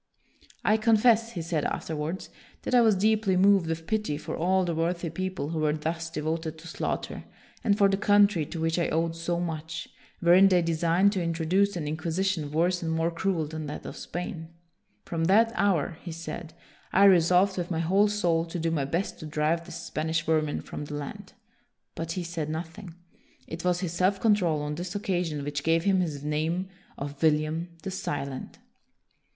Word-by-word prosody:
" - - -28
I - - +4
confess," 230 +1 +4
he 170 - -4
said 160 -3 -1
afterwards, 160 +3 -3
" - - -27
that - - -3
I 245 - +7
was 220 -3 +5
deeply 210 -1 +2
moved 195 -2 +5
with 165 0 -3
pity 215 -7 -1
for - - -5
all 185 +2 +2
the 170 - -1
worthy 170 +1 -1
people 185 -3 -3
who 160 -1 -2
were 155 -1 +2
thus 160 +2 -3
devoted 160 0 -3
to 165 +1 -12
slaughter, - - -4 0.4
and 200 -1 +3
for 200 -2 +5
the 195 0 +1
country, 205 -4 +4
to 165 - -6
which 165 +1 0
I 170 - +1
owed 165 +1 0
so 170 +1 -2
much, 165 -1 -4 0.3
wherein 180 +3 +6
they 180 -2 +3
designed 170 +4 +3
to 195 -3 -1
introduce 170 +4 +1
an 160 -4 -3
in 155 +1 -2
quisition 165 -1 -1
worse 175 +4 +1
and 165 -1 -2
more 165 +1 +1
cruel 170 -1 -1
than 155 0 -6
that 150 - -7
of - - -6
Spain. 170 -2 -6 0.6
From 165 -1 -1
that 220 +6 +5
hour," 175 -6 +1
he 175 - -7
said, 165 0 -7 0.2
" - - -29
I 195 - +5
resolved, 185 0 +5
with 175 - -3
my 170 - -1
whole 195 +5 +3
soul, 175 -6 +1
to 170 +1 -6
do 165 0 -1
my 145 -4 0
best 170 +8 -2
to 155 - -7
drive 155 +3 0
this - - -7
Spanish 160 +2 -2
vermin 155 -2 +1
from 150 - -7
the 145 - -6
land." 185 +8 -7 0.6
But 165 0 -4
he 180 - -3
said 165 -3 -4
nothing. 165 +2 -6 0.5
It 165 +1 -7
was 180 0 +1
his 175 -3 -3
self 185 +3 +2
control 180 -9 +2
on 150 0 -3
this 175 +4 -5
occasion 175 -7 -1
which 145 0 -3
gave 165 +2 +2
him 195 -1 +3
his 150 -6 -2
name 160 +5 -1 0.3
of 140 0 -6
William 155 +2 +1
the 195 - -4
Silent. 140 -7 -4
170 Hz, 195 wpm, -27 LUFS, 160-190 Hz, 0.6 s, I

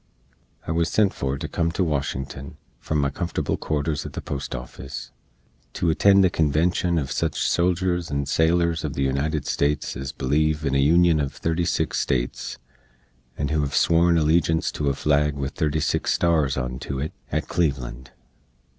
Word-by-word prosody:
I - - -3
wuz 85 0 +2
sent 105 0 +2
for 70 0 -2
to - - -5
come 85 -1 -1
to 95 - +1
Washington, 70 -3 -3 0.2
from 80 - -2
my 70 -1 +1
comfortable 85 +4 -2
quarters 75 0 -2
at - - -8
the - - -4
Post 70 - -4
Offis, 60 0 -8 0.6
to 85 - +1
attend 100 +4 +5
the 90 - +3
convenshun 85 +3 +1
uv 70 -3 -4
sich - - -1
soldiers 90 -1 +1
and 70 -1 -2
sailors 85 +2 +2
uv 75 -3 -3
the 70 - 0
United 70 +3 -1
States 70 0 0
ez 65 0 -5
bleeve 75 +3 0
in 70 - 0
a 70 - +3
Union 85 +3 +4
uv 70 -2 0
36 80 +3 -1
States, - - -2 0.8
and 70 0 -2
who 75 - +1
hev 70 -1 -1
sworn 85 +1 +4
allejinse 80 +1 +2
to 75 -2 -1
a 70 - -1
flag 75 0 +1
with 70 -1 -4
36 80 -2 0
stars 80 -6 +2
onto 65 +1 -4
it, 70 +4 -3 0.2
at - - -1
Cleveland. 65 -6 -2
75 Hz, 165 wpm, -24 LUFS, 70-85 Hz, 0.8 s, attend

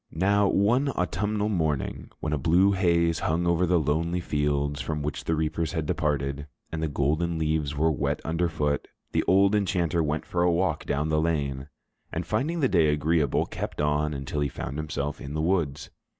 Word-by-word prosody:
Now, 100 +4 +2
one 120 +9 +2
autumnal 105 -5 -1
morning, 80 -8 -1
when 75 - -1
a 75 - 0
blue 90 +8 +4
haze 85 -4 +2
hung 85 +3 0
over 85 +1 +2
the 90 +1 +3
lonely 80 +4 0
fields 75 -2 -1
from 75 -2 -3
which 75 +2 -4
the 80 - +1
reapers 80 +2 -1
had 80 -3 -1
departed, 70 -2 -1 0.2
and 80 - -3
the 80 - 0
golden 80 +4 0
leaves 75 -2 -1
were 80 +2 +3
wet 75 - -1
underfoot, 80 -3 -1 0.2
the - - +1
old 100 +2 +5
enchanter 90 -5 +1
went 75 0 -1
for 85 - -1
a 90 0 +4
walk 90 +2 0
down 75 +2 0
the 75 0 +2
lane, 70 -4 -1 0.4
and 85 +1 -3
finding 140 - -1
the 135 - +4
day 85 -8 +3
agreeable, 75 -1 +1
kept - - -6
on 75 +1 +1
until 70 +1 -3
he 70 - +1
found 70 +3 -5
himself 75 -1 -3
in 70 +2 -6
the - - -1
woods. 80 -6 -1
80 Hz, 185 wpm, -26 LUFS, 75-90 Hz, 0.4 s, old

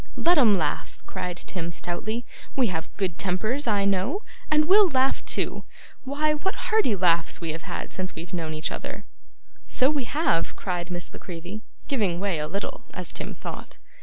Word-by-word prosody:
'Let 345 -1 +5
'em 215 -7 +6
laugh,' 155 -4 -2
cried 180 -1 -4
Tim 170 -2 -4
stoutly; 215 +8 -2 0.3
'we 260 -3 +4
have 160 -3 -3
good 185 -3 -1
tempers 215 +9 0
I 205 -3 +3
know, 200 - +1 0.3
and 305 0 +5
we'll 390 +3 +7
laugh 265 -2 +2
too. - - 0 0.4
Why, 300 +3 +2
what 380 +6 -1
hearty 430 - +2
laughs 170 -3 +3
we 165 -2 -2
have 165 +1 -5
had - - -4
since 185 0 -3
we've 170 +2 -7
known 160 -3 -2
each 155 - -1
other!' - - -5 0.6
'So 260 +3 +4
we 285 -4 0
have,' 270 - +1
cried 180 -2 -2
Miss 175 -1 -4
La - - -8
Creevy 180 +4 -6 0.3
giving 200 -11 +1
way 190 -5 0
a 150 - -1
little, 200 +5 -4
as - - -3
Tim - - -3
thought. - - -7
195 Hz, 180 wpm, -26 LUFS, 175-270 Hz, 0.6 s, we'll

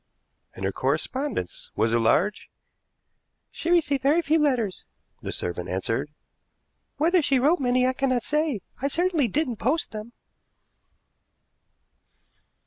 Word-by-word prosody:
"And 95 - -4
her 95 - 0
correspondence 150 - -2
was 110 +2 +1
it 120 - +3
large?" 165 - +1 1.0
"She 335 - -4
received 295 -6 +3
very 300 +6 +3
few 320 +2 +2
letters," 250 -10 0 0.4
the - - -5
servant 90 0 -3
answered; 115 +9 -2 0.9
"whether 340 +4 +3
she 275 -2 +2
wrote 295 +8 +3
many, 250 -1 +2
I 255 - +2
cannot 255 -3 0
say. 300 -7 0 0.2
I 275 - +1
certainly 330 -2 +1
didn't 245 +1 -1
post 270 +10 0
them." 215 +2 -8
255 Hz, 125 wpm, -25 LUFS, 185-300 Hz, 1.0 s, it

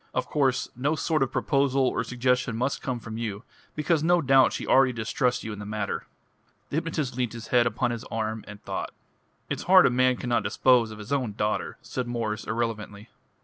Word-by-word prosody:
Of - - 0
course 135 -4 +1
no 140 +6 0
sort 155 -1 0
of 135 -1 +1
proposal 135 -1 +2
or 115 - 0
suggestion 125 -1 0
must 130 +4 -1
come 130 -2 -3
from 115 0 -7
you 105 -2 -4 0.3
because 155 +1 +1
no 175 +2 +4
doubt 135 -3 +5
she - - -4
already 130 -1 +4
distrusts 120 +2 -1
you 110 - -5
in 105 - -8
the - - -6
matter." 105 -1 -3 0.6
The 145 - -1
hypnotist 155 -6 -2
leant 125 -3 -1
his 115 -1 -8
head 120 -1 +4
upon 115 +2 0
his 120 -1 -5
arm 110 0 -3
and 105 0 -9
thought. - - -4 0.5
"It's - - -3
hard 185 -1 +8
a - - +4
man 130 +1 +3
cannot 120 -2 0
dispose 125 -2 +3
of 110 - -9
his 105 +6 -5
own 125 -7 -1
daughter," 105 +1 -2
said 125 -2 -4
Mwres 110 -3 -3
irrelevantly. 110 -2 -3
120 Hz, 200 wpm, -26 LUFS, 110-135 Hz, 0.6 s, hard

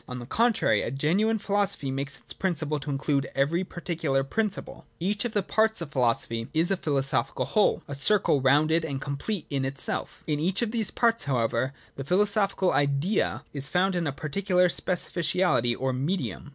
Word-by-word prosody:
On 125 - -5
the 120 - -7
contrary, 230 - +2
a - - -2
genuine 180 - +1
philosophy 200 -9 0
makes 140 +1 -4
it - - -11
a - - -6
principle 160 -5 -1
to 145 +2 -7
include 140 0 0
every 155 +7 +1
particular 165 -6 -2
principle. 210 +8 -3
15. - - -38
J 180 +4 0
Each 210 +2 -1
of 235 - -3
the 205 - +1
parts 220 +3 +2
of 165 -4 -6
philosophy 115 -3 0
is 165 +4 +2
a 195 - +2
philoso 135 -5 +1
phical - - -3
whole, 210 -2 +2
a 145 - -5
circle 145 0 +3
rounded 155 +5 +3
and 140 -4 -3
complete 145 +7 -3
in 135 -1 0
itself 135 0 -3
In 150 -2 -1
each 185 +8 +1
of 220 - -2
these 225 -3 -1
parts, 230 -5 +1
however, 125 0 0 0.2
the 135 - -4
philosophical 195 +3 +2
Idea 145 +8 +1
is 140 0 -3
found 185 +4 +2
in 175 -3 -1
a - - 0
particular 180 +6 +1
specificality 170 -8 +1
or 130 0 0
medium. 150 +3 -3
160 Hz, 190 wpm, -27 LUFS, 135-195 Hz, 0.2 s, circle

